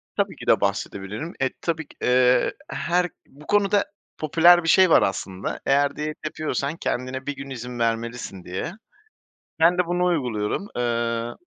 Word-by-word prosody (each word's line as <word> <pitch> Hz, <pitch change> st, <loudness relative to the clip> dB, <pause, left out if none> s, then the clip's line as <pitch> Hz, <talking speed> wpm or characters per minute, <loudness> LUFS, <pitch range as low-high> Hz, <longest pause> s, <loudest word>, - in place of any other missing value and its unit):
Tabii -, -, 0 dB
ki -, -, -11 dB
de -, -, +4 dB
bahsedebilirim. 105 Hz, -, -3 dB
E, 130 Hz, -, +2 dB
tabii 160 Hz, -3 st, -2 dB
ki, -, -, -19 dB
eee, 125 Hz, 0 st, +4 dB, 0.2 s
her 180 Hz, +1 st, 0 dB, 0.2 s
Bu 145 Hz, +2 st, -17 dB
konuda 205 Hz, 0 st, +3 dB, 0.3 s
popüler 170 Hz, +3 st, +5 dB
bir 165 Hz, -, 0 dB
şey 185 Hz, +2 st, +6 dB
var -, -, +6 dB
aslında. 95 Hz, 0 st, -3 dB
Eğer 140 Hz, +1 st, +2 dB
diyet 150 Hz, 0 st, -4 dB
yapıyorsan, 155 Hz, 0 st, -2 dB
kendine 130 Hz, -2 st, -3 dB
bir 145 Hz, -1 st, -3 dB
gün 135 Hz, 0 st, -8 dB
izin 125 Hz, -1 st, -6 dB
vermelisin, 115 Hz, -4 st, -2 dB
diye. 95 Hz, -, -4 dB, 0.9 s
Ben 175 Hz, +2 st, +5 dB
de 180 Hz, -, +2 dB
bunu 175 Hz, +1 st, 0 dB
uyguluyorum. 130 Hz, -, -1 dB
Eee 115 Hz, -1 st, -1 dB
140 Hz, 155 wpm, -24 LUFS, 115-165 Hz, 0.9 s, şey